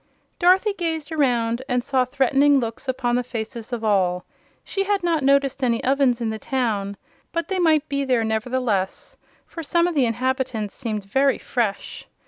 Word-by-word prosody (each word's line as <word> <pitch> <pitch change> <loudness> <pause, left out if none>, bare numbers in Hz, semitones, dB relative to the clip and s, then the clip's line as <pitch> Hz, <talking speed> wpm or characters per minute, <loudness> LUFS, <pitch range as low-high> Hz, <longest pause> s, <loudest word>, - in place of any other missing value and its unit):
Dorothy 380 +4 +4
gazed 325 -4 -3
around 245 -6 +1
and 250 -1 +1
saw 260 -1 +1
threatening 275 +2 +3
looks 230 +2 -5
upon 250 -2 -1
the 250 - +1
faces 230 0 -6
of 235 -2 -4
all. 185 -4 +1 0.4
She 390 0 -2
had 400 -2 0
not 335 -3 +1
noticed 275 0 +2
any 235 -2 +1
ovens 265 -2 +2
in 230 -2 -1
the 220 - -5
town, 215 -8 -2 0.3
but 335 +2 -3
they 380 -1 -1
might 315 -3 +3
be 280 0 -1
there, 250 -4 +1
nevertheless, 220 -3 -2 0.3
for 335 - -8
some 340 +2 +1
of 350 - -2
the 275 -5 +2
inhabitants 250 -2 -2
seemed 215 -5 -4
very 270 +7 +2
fresh. 220 -5 -3
255 Hz, 170 wpm, -23 LUFS, 230-285 Hz, 0.4 s, Dorothy